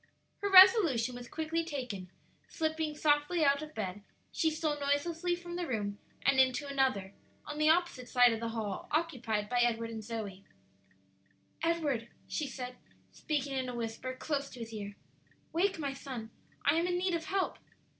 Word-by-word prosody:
Her 405 - -1
resolution 370 - +7
was 245 0 -8
quickly 320 +3 -2
taken; 250 - -5 0.4
slipping 315 -2 -2
softly 300 +2 +3
out 280 +1 +4
of 310 0 -9
bed, 205 -2 -4 0.3
she 320 - +2
stole 310 -2 -1
noiselessly 325 +5 0
from 345 0 -7
the 350 -1 -2
room 205 -5 -2 0.2
and 275 -1 +4
into 260 +2 +3
another, 260 -9 0 0.3
on 300 0 -6
the 305 0 +4
opposite 320 -7 +1
side 245 -2 +6
of 225 - -3
the 230 0 -2
hall, 220 -4 -4
occupied 245 -10 -1
by 245 +2 0
Edward 230 -1 +1
and 220 -1 -6
Zoe. 210 -4 -5 1.2
"Edward," 305 -8 0 0.2
she 300 - -2
said, 250 -1 -6 0.3
speaking 285 -3 -2
in 260 -1 -1
a 245 - -5
whisper 235 +2 -4
close 280 +1 -2
to 245 - -10
his 225 0 -7
ear, 205 -1 -6 0.6
"wake, 380 +3 +2
my 285 -3 -2
son; 255 -5 -7 0.3
I - - +4
am 340 +2 +2
in 355 0 0
need 365 0 0
of 330 -1 -1
help." 385 +1 -1
275 Hz, 170 wpm, -32 LUFS, 230-320 Hz, 1.2 s, resolution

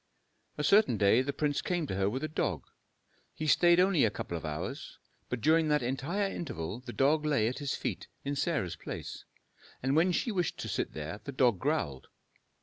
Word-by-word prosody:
A 150 - -2
certain 195 - +4
day 105 +4 +4
the 135 +2 -2
prince 145 0 -1
came 175 -3 -1
to 135 - -4
her 95 +1 +1
with 130 +7 -3
a - - 0
dog. 90 - -2 0.7
He 155 - -4
stayed 175 +3 +5
only 185 -4 +4
a 110 - +4
couple 85 - -5
of 85 - -5
hours; 75 -1 -5 0.3
but 125 -2 -3
during 160 +3 +4
that 150 -3 +2
entire 140 +11 -1
interval 100 - -5
the 125 -1 -8
dog 145 +5 +2
lay 145 -8 +2
at 125 - -3
his 145 -2 -2
feet - - -4 0.2
in 140 +1 -2
Sarah's 140 - -1
place, - - -7 0.6
and 135 +2 +1
when 170 +4 +4
she 230 +6 0
wished 180 -4 -1
to - - -5
sit - - -2
there 80 +6 -5
the 140 - -4
dog 125 -7 +2
growled. 130 - -1
140 Hz, 200 wpm, -31 LUFS, 110-160 Hz, 0.7 s, stayed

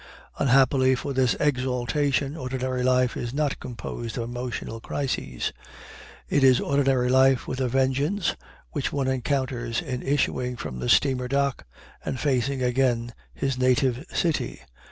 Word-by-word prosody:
Unhappily 130 0 +4
for 140 +3 -4
this 130 -1 +2
exaltation, 135 +1 0
ordinary 130 -2 -3
life 125 0 +2
is 120 +2 -4
not 145 -2 0
composed 120 -1 -6
of 120 - -1
emotional 120 -1 -5
crises. 115 - -3 0.7
It 140 - +2
is 130 -2 +6
ordinary 135 -3 +2
life 130 0 +4
with 130 - -3
a 130 - +2
vengeance 135 - +1 0.4
which 145 -4 -2
one 140 -2 -1
encounters 130 -3 -1
in 130 -6 -4
issuing 130 -3 0
from 65 - -6
the 60 -1 -2
steamer 130 -3 +3
dock 140 - 0 0.4
and 130 - -3
facing 135 -1 0
again 120 -2 +1 0.2
his 135 -2 -1
native 130 0 +2
city. 165 -3 -1
130 Hz, 135 wpm, -25 LUFS, 125-140 Hz, 0.7 s, is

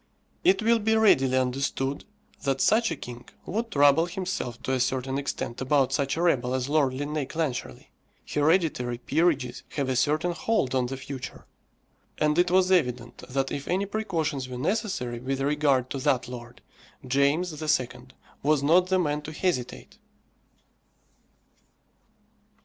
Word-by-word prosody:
It 355 - +4
will 230 +1 +4
be 220 +1 +2
readily 135 -12 +4
understood 135 +1 -1 0.4
that 135 -2 0
such 225 +1 +3
a 165 - -2
king 120 -3 -10 0.2
would 225 +5 -2
trouble 145 0 +4
himself 180 -9 -4
to - - -2
a 130 - +1
certain 130 +2 -1
extent 140 -3 -4
about 135 0 +2
such 140 +1 0
a 170 - 0
rebel 130 -7 +2
as 130 0 -1
Lord 145 -3 +2
Linnæus 145 +1 -3
Clancharlie. 155 -6 -4 0.4
Hereditary 150 -6 +1
peerages 140 -2 0
have 140 -3 -1
a 130 - 0
certain 155 +7 +1
hold 170 - 0
on 130 -2 +1
the 135 +1 -5
future, 130 -1 -8 0.7
and 150 +2 +2
it 175 0 +4
was 185 +1 +3
evident 125 -9 0
that 135 +1 -1
if 140 - -4
any 190 +3 0
precautions 165 -10 -2
were 125 - -6
necessary 185 - -2
with 135 +2 -3
regard 140 -2 +1
to 135 - -3
that 125 -1 +1
lord, 120 -1 -10 0.4
James 145 +5 +1
II. 155 -5 +2 0.5
was 145 -1 +2
not 175 +5 +4
the 190 0 +2
man 150 -4 0
to 150 - -8
hesitate. 155 -7 -3
145 Hz, 150 wpm, -26 LUFS, 130-175 Hz, 0.7 s, It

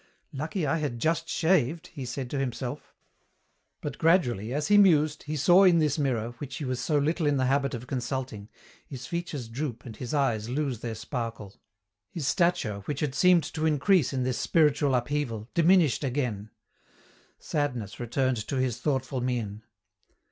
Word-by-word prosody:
"Lucky 155 +5 -3
I 160 +4 +1
had 145 -6 -3
just 165 +6 0
shaved," 165 -1 +1
he 140 -6 -6
said 125 +1 -4
to 140 - -1
himself. 125 -1 -4 0.9
But - - -5
gradually, 125 - +2
as 150 +3 -1
he 205 - +6
mused, 155 -6 +4
he 150 +1 -3
saw 180 +7 +6
in 180 -3 +6
this 155 -2 +1
mirror, 120 -5 0
which 140 -3 -6
he 150 - -4
was 130 -1 -2
so 150 - +1
little 155 +2 +1
in 145 -1 +2
the 130 - +1
habit 140 0 +1
of 120 +1 -7
consulting, 125 -4 -4 0.4
his 130 -3 -8
features 165 -6 -4
droop 120 -1 -5
and 115 - -8
his 120 +1 -6
eyes 120 -7 0
lose 135 -3 -2
their 115 -1 -5
sparkle. 115 -3 -5 0.6
His 160 -5 -5
stature, 170 - +1
which 150 - -3
had 145 -4 -1
seemed 180 +2 +4
to 160 0 0
increase 155 -1 +3
in 130 -2 -1
this 125 -1 -1
spiritual 145 -4 +3
upheaval, 120 -3 -2
diminished 170 - +4
again. 125 -6 -2 0.9
Sadness 125 -9 -3
returned 130 +1 0
to 140 - -3
his 130 -2 -1
thoughtful 130 -2 -1
mien. 115 -4 -2
135 Hz, 170 wpm, -27 LUFS, 120-155 Hz, 0.9 s, he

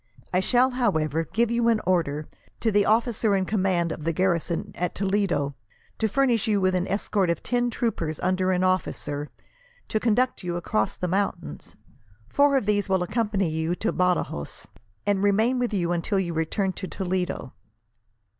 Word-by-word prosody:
I 180 - +4
shall, 250 +6 +3
however, 160 - 0
give 235 0 +1
you 235 0 +2
an 230 -2 +3
order, 155 -5 0 0.3
to 225 - +2
the 205 0 +3
officer 225 -1 +2
in 190 -1 +1
command 185 -4 +1
of 155 - -6
the 165 - +1
garrison 170 -1 0
at 180 - -3
Toledo, 190 -7 0 0.5
to 220 - +2
furnish 240 -1 +2
you 210 -2 +2
with 185 -1 +2
an 180 0 0
escort 200 -1 0
of 170 - -1
ten 245 0 +1
troopers 170 -10 -2
under 185 +1 +1
an 180 0 +1
officer, 150 -5 -1 0.6
to 215 - +1
conduct 245 +3 +1
you 175 -1 -2
across 200 +3 -1
the 180 - -2
mountains. 175 - -3 0.5
Four 285 - +4
of 255 - -1
these 205 -1 +1
will 190 -2 +2
accompany 205 -2 0
you 160 +2 -1
to 220 +5 -1
Badajos, 180 - -1 0.4
and 200 -1 +1
remain 220 +5 +2
with 245 -2 0
you 175 -4 0
until 175 +4 0
you 175 -3 -2
return 185 +4 -1
to 190 - -6
Toledo. 180 -9 -3
190 Hz, 170 wpm, -25 LUFS, 175-220 Hz, 0.6 s, I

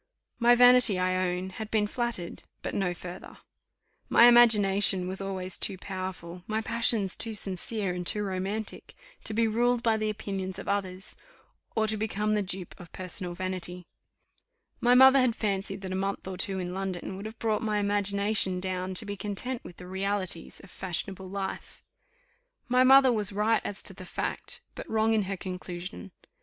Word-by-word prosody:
My 240 0 +6
vanity, 245 -4 +7
I 185 0 +1
own, 180 +1 -4
had 215 +3 -7
been 215 -2 +2
flattered, 230 -5 -3 0.2
but - - -3
no 190 -3 0
further. 175 +1 -9 0.7
My - - +6
imagination 205 -6 +5
was 190 +1 -3
always 190 -2 -3
too 190 - 0
powerful, 185 -2 -6
my 220 0 -1
passions 220 -3 +1
too 225 -1 -4
sincere 195 0 -2
and 180 0 -4
too 210 - +2
romantic, 195 +3 -4 0.3
to 215 - -2
be 230 0 +3
ruled 240 +2 +1
by 225 -1 +3
the 215 0 -1
opinions 195 -3 -4
of - - -8
others, 190 -1 -3 0.6
or 220 - +2
to 215 0 0
become 210 0 -1
the 210 -1 +2
dupe 185 -2 -4
of 175 -2 -12
personal 180 -1 -6
vanity. 180 -1 -4 0.9
My 245 +1 +4
mother 265 +1 +8
had 250 -3 +2
fancied 195 -1 -2
that 190 -1 -6
a - - -2
month 195 0 -3
or 190 - -4
two 190 +1 -3
in 180 -1 -4
London 190 -1 -4
would 200 +3 -6
have 220 +1 -10
brought 220 -2 0
my 215 -2 0
imagination 200 -1 +2
down 185 0 -3
to 215 - -1
be 205 0 -4
content 210 +5 -4
with 175 - -11
the 180 - -10
realities 190 -2 -3
of 195 - -14
fashionable 190 +1 -4
life. 195 0 -6 0.8
My 250 +1 +4
mother 265 -1 +7
was 210 -2 +1
right 210 +3 +2
as 205 - -4
to - - -3
the 185 0 -10
fact, - - -4
but - - -9
wrong 220 0 +2
in 215 -3 +1
her 195 - -3
conclusion. 180 +1 -7
195 Hz, 175 wpm, -28 LUFS, 185-220 Hz, 0.9 s, mother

